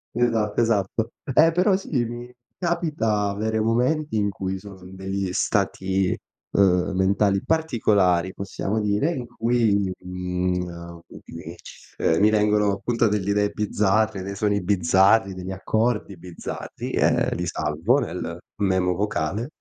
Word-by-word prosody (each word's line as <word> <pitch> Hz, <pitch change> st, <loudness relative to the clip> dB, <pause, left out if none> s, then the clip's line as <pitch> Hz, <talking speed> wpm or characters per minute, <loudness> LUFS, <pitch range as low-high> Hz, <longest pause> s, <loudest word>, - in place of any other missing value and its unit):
Esatto, 115 Hz, -3 st, +1 dB
esatto, 115 Hz, 0 st, 0 dB, 0.2 s
eh, 165 Hz, +1 st, +6 dB
però 185 Hz, +3 st, +3 dB
sì, 155 Hz, -10 st, -1 dB
mi 120 Hz, +1 st, -7 dB, 0.2 s
capita 155 Hz, -, 0 dB
avere 110 Hz, +2 st, -1 dB
momenti 125 Hz, +6 st, +1 dB
in 105 Hz, -1 st, +1 dB
cui 95 Hz, -1 st, -4 dB
sono 95 Hz, -1 st, -12 dB
in 95 Hz, -, -12 dB
degli 95 Hz, 0 st, -3 dB
stati, 95 Hz, 0 st, 0 dB, 0.3 s
uhm, 95 Hz, -1 st, +3 dB
mentali 100 Hz, +1 st, +2 dB
particolari, 105 Hz, -, +2 dB
possiamo 100 Hz, +2 st, -3 dB
dire, 105 Hz, +9 st, +1 dB
in 125 Hz, -7 st, -4 dB
cui 115 Hz, -2 st, +1 dB
mi 100 Hz, -2 st, 0 dB
mi 90 Hz, 0 st, -2 dB
mhmm, 85 Hz, -1 st, -7 dB
mi -, -, -10 dB
ci -, -, -15 dB
uhm, 80 Hz, -, +3 dB
mi 105 Hz, -, +5 dB
vengono 105 Hz, -1 st, +3 dB
appunto 115 Hz, +3 st, 0 dB
delle 100 Hz, -2 st, -1 dB
idee 105 Hz, 0 st, +2 dB
bizzarre, 105 Hz, -1 st, +1 dB
dei 100 Hz, +1 st, -5 dB
suoni 100 Hz, -1 st, 0 dB
bizzarri, 95 Hz, +2 st, +3 dB
degli 95 Hz, +1 st, -6 dB
accordi 105 Hz, +1 st, -1 dB
bizzarri, 85 Hz, 0 st, -7 dB
e -, -, +2 dB
li 90 Hz, -, -2 dB
salvo 80 Hz, -, +1 dB
nel 90 Hz, -7 st, -4 dB, 0.2 s
memo 95 Hz, -2 st, +2 dB
vocale, 105 Hz, -, -2 dB
100 Hz, 140 wpm, -24 LUFS, 95-115 Hz, 0.3 s, eh